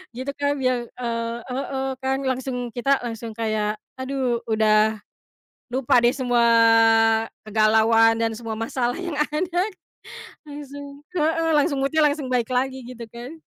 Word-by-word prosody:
gitu 260 +3 -4
kan. 285 0 +1
Biar, 255 -2 0
eee 230 -1 -3
heeh, 265 +1 -3 0.2
kan 265 0 0
langsung 255 -2 -3
kita 275 +3 +2
langsung 230 -1 -5
kayak, 215 -1 -1 0.2
aduh 260 -2 -1
udah 215 0 +3 0.7
lupa 250 0 +2
deh 240 +1 +3
semua 245 -3 +1 1.0
kegalauan 220 +1 +4
dan 225 - +1
semua 225 -2 -5
masalah 240 +2 -2
yang 350 -5 -5
ada, 335 +4 0 0.8
langsung 285 -1 -9 0.3
heeh 325 0 +1
langsung 285 -1 +2
mood-nya 305 +3 +2
langsung 290 -2 +1
baik 250 -1 -1
lagi 260 +1 -1
gitu 240 -1 -9
kan. 245 +8 -10
250 Hz, 135 wpm, -23 LUFS, 230-275 Hz, 1.0 s, kegalauan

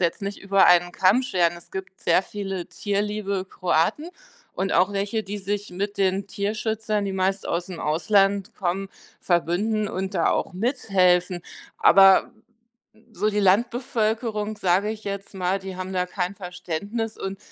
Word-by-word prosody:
jetzt 175 +4 0
nicht 200 +1 -4
über 195 0 +4
einen 175 0 +5
Kamm 190 +8 +3
scheren. 175 -9 +1
Es 170 - -14
gibt 190 0 -7
sehr 170 +2 +3
viele 195 -4 -5
tierliebe 200 +1 -2
Kroaten 180 - 0 0.5
und 195 +1 -1
auch 190 +3 +3
welche, 200 +3 -1
die 205 +1 -6
sich 205 +1 -3
mit 200 +3 -4
den 195 0 +1
Tierschützern, 215 +1 -2
die 195 - -3
meist 190 +1 -1
ausm 175 0 -3
Ausland 195 +4 +1
kommen, 195 +1 -2 0.3
verbünden 195 +5 0
und 190 0 -4
da 170 - +2
auch - - -1
mithelfen. 185 -5 +1 0.4
Aber 195 +4 +6 0.8
so 215 - 0
die 210 0 -1
Landbevölkerung, 220 +1 0
sage 190 +1 +2
ich 215 0 -6
jetzt 200 0 -6
mal, 190 +1 0
die 190 -1 -7
haben 185 +1 -5
da 180 -1 0
kein 180 0 -3
Verständnis 195 +5 -4
und 195 0 -5
195 Hz, 150 wpm, -24 LUFS, 185-210 Hz, 0.8 s, Aber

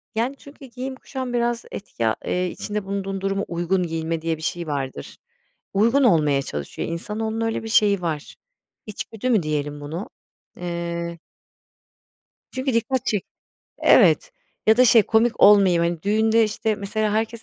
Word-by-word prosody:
Yani, 245 +5 0
çünkü 280 -1 -14
giyim 260 +1 -6
kuşam 260 -2 -6
biraz 240 0 0
etki, 115 - -3
aaa, 110 - +1
eee, 180 0 0
içinde 210 +2 -4
bulunduğun 195 -1 -3
duruma 195 0 -1
uygun 175 +2 0
giyinme 165 -1 -3
diye 165 -1 -1
bir - - -13
şey 170 +1 -3
vardır. 135 - -5 0.6
Uygun 230 +8 +3
olmaya 150 - +3
çalışıyor. 75 - -5
İnsanoğlunun 220 +6 -3
öyle 225 0 -2
bir 225 - -6
şeyi 205 -3 +3
var. 155 -4 -4 0.5
İçgüdü 220 +3 -5
mü 215 -8 +3
diyelim 145 -1 -3
bunu? 160 +7 -6 0.5
Eee 170 -1 -4 1.3
Çünkü 260 0 -2
dikkat 250 +2 0
çek 205 -4 -1 0.5
Evet - - +5 0.4
ya 220 +1 +6
da 255 - +6
şey 230 -2 +7
komik 225 +2 +1
olmayayım, 195 -4 +6
hani, 170 -2 -2
düğünde, 220 +2 +3
işte, 215 +1 -1
mesela, 210 +1 -2
herkes 225 +1 -2
200 Hz, 150 wpm, -23 LUFS, 170-225 Hz, 1.3 s, şey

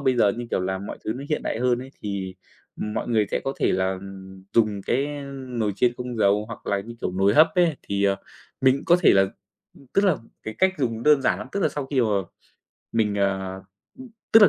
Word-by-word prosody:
bây 130 -2 +2
giờ, 105 -4 +4
như 120 0 -5
kiểu - - +1
là, 95 +1 -1
mọi 100 - -7
thứ 110 - -1
nó 130 +4 -7
hiện 150 - -1
đại - - -2
hơn 125 0 +2
ấy 130 +2 -8
thì, 100 -2 -4 0.5
ừm, 105 0 -3
mọi - - -2
người 110 -3 +2
sẽ - - 0
có 135 - -1
thể - - +3
là 95 0 0 0.5
dùng 105 -3 +2
cái 130 +7 +1 0.4
nồi 115 -4 -1
chiên 120 +3 +3
không 125 -1 -5
dầu, 105 0 +3
hoặc - - -9
là, 100 -1 +1
như 115 +4 -9
kiểu, - - -1
nồi 95 +2 +3
hấp 155 +4 +7
ấy, 175 -5 +3
thì, 100 0 -1
ờ, 100 -1 +3 0.4
mình 130 +1 +3
có 175 - +6
thể - - +7
là 95 - +6 0.5
ừm, 140 - -18
tức 200 - +3
là 185 -5 +4 0.3
cái 110 - -5
cách 190 0 +3
dùng 115 -4 -1
đơn 150 -2 +5
giản - - +2
lắm, - - -6
tức 200 - -1
là - - +2
sau 145 -2 -4
khi 135 -1 +1
mà 115 - +2 0.8
mình, 110 -3 +1
à, 95 -1 0
ừm 95 - -10 0.7
tức 225 - +9
là 205 - +9
115 Hz, 240 wpm, -24 LUFS, 100-135 Hz, 0.8 s, tức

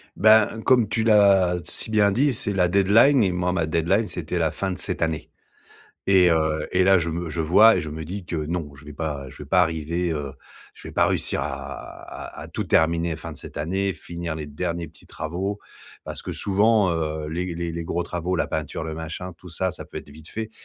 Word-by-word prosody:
Ben, 110 +1 +4
comme 125 -4 +4
tu 110 +1 0
l'as 100 -5 +5
si 110 - +2
bien 105 -2 +4
dit, 135 +7 +2
c'est 105 -2 +1
la 90 -2 +3
deadline 105 +8 +5
et 95 - +2
moi 90 0 -1
ma 85 -3 0
deadline, 85 +7 +1
c'était 90 -1 -3
la 80 -2 +1
fin 95 +5 -3
de 90 - -4
cette - - -2
année 80 -1 -1 0.8
et 95 -2 +5
heu, 80 -1 +1
et 90 0 +3
là, 95 0 +6
je 85 -1 -2
me 85 0 -3
je 85 - -3
vois 105 +8 +6
et - - 0
je 80 - -5
me 80 +1 -6
dis 90 +3 -6
que 85 - -3
non, 75 -1 -3
je 70 - -15
vais 75 - -9
pas 75 -2 -4
je - - -15
vais 75 - -9
pas 90 +3 +4
arriver, 85 +1 -1
heu, 75 -3 -4 0.4
je - - -13
vais - - -8
pas - - +3
réussir - - 0
à 70 +1 -5 0.7
à - - -7
-à - - -15
tout - - -3
terminer 85 0 +2
fin - - -8
de - - -9
cette - - -10
année, 95 +5 -1
finir 85 -1 -6
les 80 -1 -5
derniers 85 +3 -3
petits 80 +2 -16
travaux 95 +6 -4 0.5
parce - - -6
que - - -6
souvent, 105 0 +3
heu, 80 -2 -2
les 85 +2 -3
les 85 0 -3
les 85 0 -4
gros 85 +2 -1
travaux, 90 +1 -3
la - - 0
peinture, 80 0 -4
le 80 - -4
machin, 80 +3 -6
tout 90 - -13
ça, 90 +3 -1
ça - - -7
peut - - -11
être - - -8
vite 75 +2 -14
fait 110 0 -5
85 Hz, 235 wpm, -24 LUFS, 80-95 Hz, 0.8 s, là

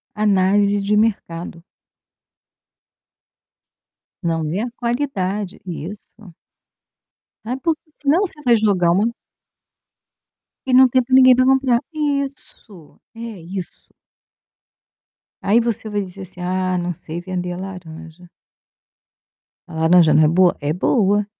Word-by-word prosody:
Análise 205 0 +2
de 200 +1 0
mercado. 170 -6 -2 2.6
Não 165 -1 -1
vê 170 +6 -2
a 235 +2 -3
qualidade, 210 -6 -2
isso. 180 +3 -7 1.4
Sabe, 250 +4 -4
porque 330 -2 0 0.2
senão 295 +4 +2
você 355 -6 -2
vai 240 -1 +5
jogar 200 -6 +2
uma 205 +6 +2 1.6
E 260 - 0
não 260 +1 +8
tem 255 +1 +2
pra 260 +2 +1
ninguém 255 -1 +7
para 255 +1 +3
comprar, 265 -2 +3
isso, 280 - -5 0.2
é - - -12 0.2
isso. 180 +2 -9 1.5
Aí 215 +4 +3
você 230 -2 -2
vai 205 -1 -1
dizer 195 0 -8
assim: 185 -1 -10
"Ah, 185 0 -1
não 175 0 -2
sei 165 +1 -7
vender 180 0 -4
a - - -7
laranja". 175 -2 -10 1.4
A - - -12
laranja 160 0 +4
não 155 - +5
é - - +5
boa? 175 +3 +3
É 145 0 -2
boa. 205 +2 +1
200 Hz, 120 wpm, -20 LUFS, 175-240 Hz, 2.6 s, não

